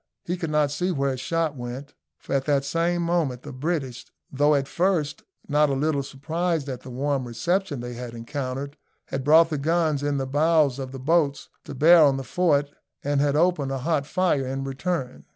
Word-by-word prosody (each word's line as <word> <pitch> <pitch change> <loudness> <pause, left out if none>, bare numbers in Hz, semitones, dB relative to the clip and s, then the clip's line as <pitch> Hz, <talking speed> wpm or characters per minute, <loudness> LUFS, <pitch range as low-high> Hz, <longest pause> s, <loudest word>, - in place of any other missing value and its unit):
He 175 - -1
could 170 -3 -4
not 150 -2 +2
see 180 +6 -1
where 140 -4 0
his 130 - -4
shot 165 +2 -1
went, 125 +3 -7 0.2
for - - -7
at 135 -1 +1
the 145 -2 +2
same 170 +4 0
moment 165 -8 0
the 145 - -8
British, 135 -3 -3 0.3
though 145 +2 +3
at 135 -1 0
first 170 -4 0 0.3
not 150 0 +3
a - - 0
little 140 +1 0
surprised 155 +3 -2
at 130 -2 -5
the 130 - -10
warm 135 0 -1
reception 145 +5 -1
they 120 0 -6
had 120 -1 -7
encountered, 135 +3 -5 0.3
had 135 - -3
brought 160 +3 +6
the 150 - -1
guns 160 -1 +1
in 145 -1 0
the 135 - -1
bows 145 -1 +2
of 130 -1 -5
the 135 - -7
boats 145 0 +1 0.2
to 140 - -7
bear 165 +6 +7
on 140 -3 +5
the 135 - -4
fort, 145 -3 +1 0.3
and 145 0 +1
had 145 0 +1
opened 155 -4 +2
a 135 - -1
hot 145 +1 -1
fire 180 -6 +1
in 135 +1 -3
return. 135 0 -3
145 Hz, 205 wpm, -25 LUFS, 135-165 Hz, 0.3 s, bear